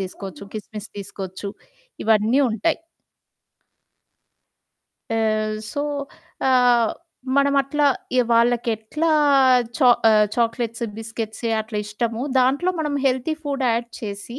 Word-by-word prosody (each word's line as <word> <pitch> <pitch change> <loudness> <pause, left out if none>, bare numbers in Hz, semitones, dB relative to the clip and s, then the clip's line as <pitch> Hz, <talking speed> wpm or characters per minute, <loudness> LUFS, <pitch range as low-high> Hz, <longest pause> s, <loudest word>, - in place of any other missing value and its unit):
తీసుకోవచ్చు, 190 -2 -7
క్రిస్మిస్ 215 0 -7
తీసుకోవచ్చు, 195 0 -6 0.6
ఇవన్నీ 220 +4 +3
ఉంటాయి. 225 +11 0 2.4
ఆహ్, 215 -1 0 0.2
సో, 285 - -2 0.7
ఆహ్, 245 -3 +4 0.5
మనమట్లా 280 +1 +2 0.3
ఇ - - +7
వాళ్ళకెట్లా 235 +5 +1 0.7
చా 255 -4 +6 0.2
ఆహ్, 210 -1 +5
చాక్లెట్స్, 230 0 -1
బిస్కెట్స్ 225 0 -6 0.2
అట్లా 215 -1 -4
ఇష్టమో 225 +3 -3 0.2
దాంట్లో 275 +8 +2
మనం 300 -2 -1
హెల్తీ 260 +4 0
ఫుడ్ 280 -2 -2
యాడ్ 235 +1 -1
చేసి, 210 +3 -6
230 Hz, 95 wpm, -22 LUFS, 215-260 Hz, 2.4 s, ఇ